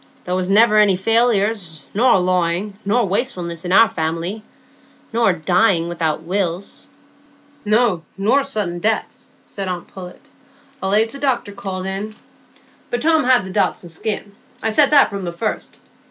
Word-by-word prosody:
There 180 - -3
was 185 0 -1
never 215 +1 +5
any 205 -3 +4
failures, 205 - 0
nor 240 +1 +4
lawing, 180 +2 0
nor 225 +3 +1
wastefulness 180 -5 -2
in 175 - -3
our 225 +4 +7
family, 165 +4 -3 0.7
nor 230 -3 +3
dying 175 +1 +1
without 160 -2 -2
wills——" 185 +1 -3 0.8
"No, 210 -4 +2 0.2
nor 220 +8 +2
sudden 210 -11 -3
deaths," 220 +4 -2
said 195 -1 -6
aunt 180 -1 -4
Pullet; 180 -2 -12 0.5
"allays 210 +4 +2
the 275 - -9
doctor 260 -7 -1
called 190 -2 -5
in. 200 +3 -4 0.7
But 240 +2 -2
Tom 320 -3 +3
had 250 -6 +4
the 190 - -7
Dodson 175 -1 -1
skin; 205 +5 -4 0.3
I 220 - +1
said 275 +6 +4
that 285 -5 +5
from 200 -1 -5
the 175 - -3
first. 210 +6 -4
195 Hz, 150 wpm, -19 LUFS, 180-225 Hz, 0.8 s, our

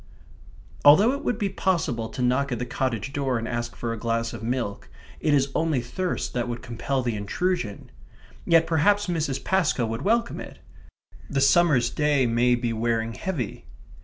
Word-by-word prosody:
Although 185 +12 +7
it 280 +2 -4
would 245 - 0
be 205 -3 0
possible 160 -13 -1
to 125 - -4
knock 130 +3 +1
at 120 - -1
the 125 - -3
cottage 130 0 -2
door 135 -3 0
and 115 0 -4
ask 120 0 -3
for 115 -1 -3
a 115 - -6
glass 115 0 -1
of 115 - -7
milk, 115 -3 -3 0.3
it 155 - +1
is 140 -1 +2
only 160 -4 +1
thirst 180 +10 -3
that 120 -1 -1
would 120 -1 -5
compel 130 +3 -2
the 120 -2 -1
intrusion. 110 - -2 0.5
Yet 165 -1 +4
perhaps 200 +6 +2
Mrs. 160 -6 -2
Pascoe 175 -10 +1
would 115 +2 -4
welcome 230 +6 +1
it. - - -9 0.7
The 140 - 0
summer's 140 -2 +4
day 150 -3 +2
may 120 +1 +3
be 120 -1 -2
wearing 115 0 -1
heavy. 145 - -4
130 Hz, 175 wpm, -25 LUFS, 115-165 Hz, 0.7 s, Although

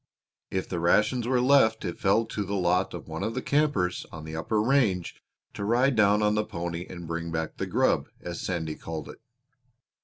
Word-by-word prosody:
If 95 -1 -2
the 90 - -3
rations 105 +8 +2
were 125 0 +2
left 125 -4 +4
it 85 - -4
fell 105 +4 +3
to 110 -2 -3
the 100 +1 -3
lot 90 0 +1
of 85 - -8
one 80 0 -5
of 115 - -2
the 130 - -1
campers 140 -12 +1
on 80 -1 -8
the 80 0 -6
upper 105 +7 0
range 110 -7 +1 0.3
to - - -5
ride 120 +5 +3
down 105 -1 +4
on 105 0 +3
the 105 0 +1
pony 85 -3 -5
and 85 -2 -8
bring 85 +1 -4
back 80 -1 -3
"the - - -3
grub," - - +2
as 85 -1 -6
Sandy 80 -4 -2
called 80 -1 -6
it. - - -12
95 Hz, 205 wpm, -27 LUFS, 85-110 Hz, 0.3 s, left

